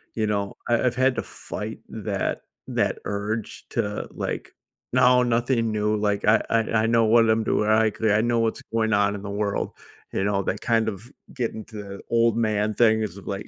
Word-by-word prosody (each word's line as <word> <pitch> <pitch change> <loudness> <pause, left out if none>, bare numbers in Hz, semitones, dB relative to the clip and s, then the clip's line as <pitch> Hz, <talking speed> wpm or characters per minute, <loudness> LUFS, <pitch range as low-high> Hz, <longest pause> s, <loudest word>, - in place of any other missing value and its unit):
you 110 - 0
know, 100 -1 -1 0.2
I 120 -1 +3
I've 125 -1 +1
had 130 +1 +3
to - - -2
fight - - -7
that - - -3 0.3
that - - 0
urge 105 +2 -4
to, 105 0 -2
like, - - -5 0.4
"No. 125 0 +5
Nothing 120 -1 +1
new, 105 0 0
like, 105 -1 0
I 110 +1 +5
I 115 - +3 0.2
I - - +2
know 115 0 +4
what 115 +1 +5
I'm 110 0 +3
doing. 105 0 +1
I 110 0 +4
could 110 +1 0
I 105 +1 +4
know 120 0 +1
what's 115 -1 0
going 110 -1 +1
on 100 0 +3
in 100 - -6
the 105 - -5
world." 100 0 -1 0.4
You - - 0
know 100 -1 +1
that - - -2
kind 115 -2 +2
of 110 +4 -5 0.2
getting 110 -3 -3
to 110 - -14
the 100 0 -9
old 115 -1 +3
man 110 -2 +1
things 110 0 +4
it's 100 -4 -4
just 100 - -12
like, 100 0 -4
110 Hz, 210 wpm, -24 LUFS, 105-115 Hz, 0.4 s, No